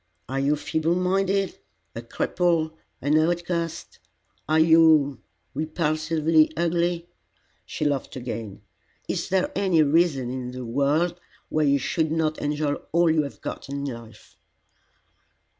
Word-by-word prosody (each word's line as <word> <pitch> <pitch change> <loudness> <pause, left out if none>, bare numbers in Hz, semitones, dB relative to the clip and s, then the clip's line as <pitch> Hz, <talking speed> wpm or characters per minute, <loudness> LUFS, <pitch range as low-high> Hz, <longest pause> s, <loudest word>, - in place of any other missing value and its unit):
Are 135 +2 -2
you 140 +2 +2
feeble 160 +3 -1
minded, 195 +2 0 0.4
a - - -4
cripple, 165 -3 0 0.3
an 150 +3 +3
outcast? 170 0 -2 0.5
Are 155 - +3
you 160 -3 +5 0.3
repulsively 155 +1 +1
ugly?" 170 0 0 0.6
She - - -3
laughed 140 -3 -1
again. 115 -5 -6 0.4
"Is - - -2
there 190 0 +1
any 185 -5 +3
reason 145 -4 +2
in 125 -1 -5
the 130 -1 -6
world 150 +8 0 0.3
why 155 -1 +1
you 140 0 +4
should 155 +4 -1
not 160 -1 0
enjoy 145 0 -1 0.2
all 170 0 +4
you 155 -1 +3
have 140 -2 -7
got - - -6
in 140 0 -4
life?" 115 -4 -9
155 Hz, 125 wpm, -25 LUFS, 140-170 Hz, 0.6 s, you